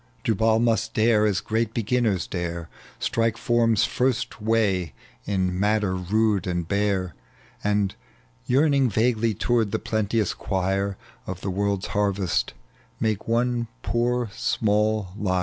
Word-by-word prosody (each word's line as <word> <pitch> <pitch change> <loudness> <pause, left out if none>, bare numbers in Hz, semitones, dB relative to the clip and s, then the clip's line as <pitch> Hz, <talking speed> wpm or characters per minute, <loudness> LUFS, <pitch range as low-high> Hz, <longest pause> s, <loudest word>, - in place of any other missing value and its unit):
Jubal 110 +1 +2
must 115 -1 +1
dare 110 -1 +4
as 100 -4 0
great 110 0 -1
be^nners 115 -5 +1
dare, 85 -2 -4 0.3
Strike 115 -1 0
form's 115 -3 +2
first 125 0 -1
way 105 -7 +1 0.3
in 95 -2 0
matter 105 -1 +2
mde 100 +2 +1
and 85 -2 -2
bare, 100 -3 0 0.5
And, 105 -1 +1 0.5
yearning 140 -1 +3
vaguely 115 0 +1
toward 115 -1 +1
the - - +1
plenteous 110 -1 0
choir 95 +1 -1 0.3
Of 95 0 -5
the 95 - -2
world's 100 0 -1
harvest, 100 -8 0 0.4
make 110 -2 -1
one 120 +1 +1 0.2
poor 120 -1 0
small 110 -4 +1
lyre. 95 -3 0
105 Hz, 125 wpm, -24 LUFS, 95-115 Hz, 0.5 s, dare